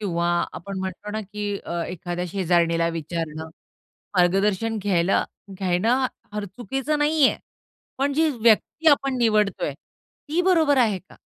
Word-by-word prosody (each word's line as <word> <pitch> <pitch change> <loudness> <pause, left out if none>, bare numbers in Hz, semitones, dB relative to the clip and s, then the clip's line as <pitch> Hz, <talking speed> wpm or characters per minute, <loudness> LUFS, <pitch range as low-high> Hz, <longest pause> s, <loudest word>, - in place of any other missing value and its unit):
किंवा 170 -4 -1 0.3
आपण 195 +2 -6
म्हणतो 190 +2 -5
ना 215 +1 -3
की 205 0 -4
अ, 170 0 -3
एखाद्या 175 0 -4
शेजारणीला 170 -2 +1
विचारणं. 160 -1 -4 0.7
मार्गदर्शन 195 +5 +2
घ्यायला 185 -2 +2 0.3
घ्यायला 205 +8 +2 0.3
फार 210 -1 -3
चुकीचं 265 +9 -3
नाहीये, 295 -1 +3 0.6
पण 280 +1 +1
जी 315 +3 +3
व्यक्ती 235 +8 +4
आपण 275 -2 +2
निवडतोय 210 -9 +1
ती 300 - -6
बरोबर 325 -6 +4
आहे 220 -6 +3
का? 185 - -19
205 Hz, 125 wpm, -24 LUFS, 175-255 Hz, 0.7 s, व्यक्ती